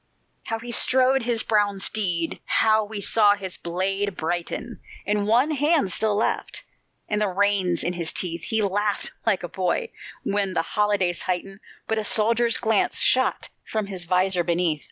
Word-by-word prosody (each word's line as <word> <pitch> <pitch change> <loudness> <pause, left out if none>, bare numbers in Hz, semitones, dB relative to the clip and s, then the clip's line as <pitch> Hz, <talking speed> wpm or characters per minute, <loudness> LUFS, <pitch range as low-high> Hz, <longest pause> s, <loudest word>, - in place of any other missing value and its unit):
How 225 - -2
he 240 +1 -8
strode 260 +2 +3
his 235 -1 +1
brown 205 -2 +1
steed! 175 -5 -1
How 220 0 +3
we 210 0 -6
saw 205 0 +4
his 190 -2 -7
blade 195 +3 -2
brighten 170 +2 -4 0.3
In 210 +2 +1
the 205 - -1
one 245 +8 +3
hand 295 - +2
still 215 +1 +2
left, 215 - -1 0.4
and 210 0 -1
the 210 - +2
reins 195 -2 +1
in 175 - -1
his 170 -2 0
teeth! 170 -2 -1
He 220 +4 -1
laughed 205 +1 -1 0.2
like 200 -5 +2
a - - -3
boy 190 - -2 0.3
when 195 -2 -1
the 165 - +1
holidays 205 -4 +1
heighten, 195 +2 -3 0.3
But 220 0 0
a - - -2
soldier's 230 +2 +2
glance 220 -3 +1
shot 260 0 +2
from 215 -2 -3
his 190 -3 -4
visor 180 +1 +1
beneath. 170 -3 0
205 Hz, 170 wpm, -24 LUFS, 180-220 Hz, 0.4 s, saw